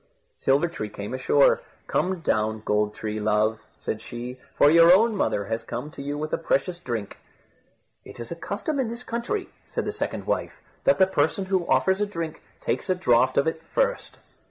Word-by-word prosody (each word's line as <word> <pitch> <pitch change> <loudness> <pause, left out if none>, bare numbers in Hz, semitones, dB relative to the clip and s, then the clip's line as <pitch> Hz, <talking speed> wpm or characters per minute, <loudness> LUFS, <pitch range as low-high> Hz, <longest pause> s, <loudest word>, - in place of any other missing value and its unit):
Silver 140 - +2
tree 110 -11 -5
came 105 +3 -6
ashore. 135 +2 +4 0.2
"Come 185 -1 0
down, 110 -5 0
Gold 105 0 +1
tree, 110 0 -4
love," 110 +1 +1 0.2
said - - -4
she, 125 +2 -7 0.2
"for 145 - +6
your 165 +1 +8
own 220 +4 +5
mother 100 - 0
has 115 +2 -2
come 120 +6 -6
to 145 - -9
you 145 +1 -3
with 155 +1 -4
a - - +1
precious 175 +2 0
drink." 120 - -5 0.8
"It - - -12
is 120 - -7
a - - -3
custom 215 - -3
in 250 -4 0
this 235 +2 -6
country," 245 - -3 0.2
said - - -3
the - - -1
second - - -3
wife, - - -2 0.3
"that 275 - +5
the 190 - +6
person 190 +1 0
who 185 -2 0
offers 190 +1 +3
a 210 - +2
drink 165 -5 -5 0.2
takes - - -2
a 185 - +3
draught 130 -8 +3
out - - +7
of 140 - -4
it 160 0 -2
first." - - 0
155 Hz, 200 wpm, -25 LUFS, 115-190 Hz, 0.8 s, your